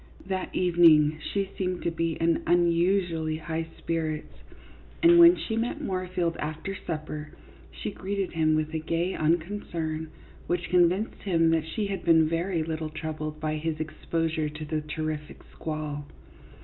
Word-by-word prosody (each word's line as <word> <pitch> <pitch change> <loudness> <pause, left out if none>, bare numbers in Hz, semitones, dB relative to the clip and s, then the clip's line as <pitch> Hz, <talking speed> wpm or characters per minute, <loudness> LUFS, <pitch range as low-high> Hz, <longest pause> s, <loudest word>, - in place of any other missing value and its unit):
That 190 -1 -3
evening 160 -4 +5
she 195 +3 -2
seemed 185 -2 -1
to 170 - 0
be 165 0 -1
in 165 +1 +1
unusually 170 -2 +2
high 160 +1 -3
spirits, 160 -2 -3 0.7
and 345 0 +8
when 340 +1 +9
she 225 - -3
met 230 +2 -1
Moorfield 185 -2 -2
after 155 +6 -4
supper, 155 -3 -5 0.4
she - - -5
greeted 195 0 -3
him 155 -1 +3
with 155 0 -1
a 160 - 0
gay 165 +4 -1
unconcern 160 -1 -1 0.4
which 175 0 -1
con 175 -1 +6
vinced 200 +5 -3
him 165 -4 +3
that 160 -1 +1
she 210 +6 -2
had 200 -1 -3
been 160 -2 +5
very 165 +1 0
little 160 -1 -3
troubled 155 -1 -5
by 155 0 -1
his 155 0 -2
exposure 160 0 -2
to 150 +1 -7
the 155 0 -2
terrific 150 0 -5
squall. 150 -2 -4
165 Hz, 150 wpm, -27 LUFS, 155-180 Hz, 0.7 s, when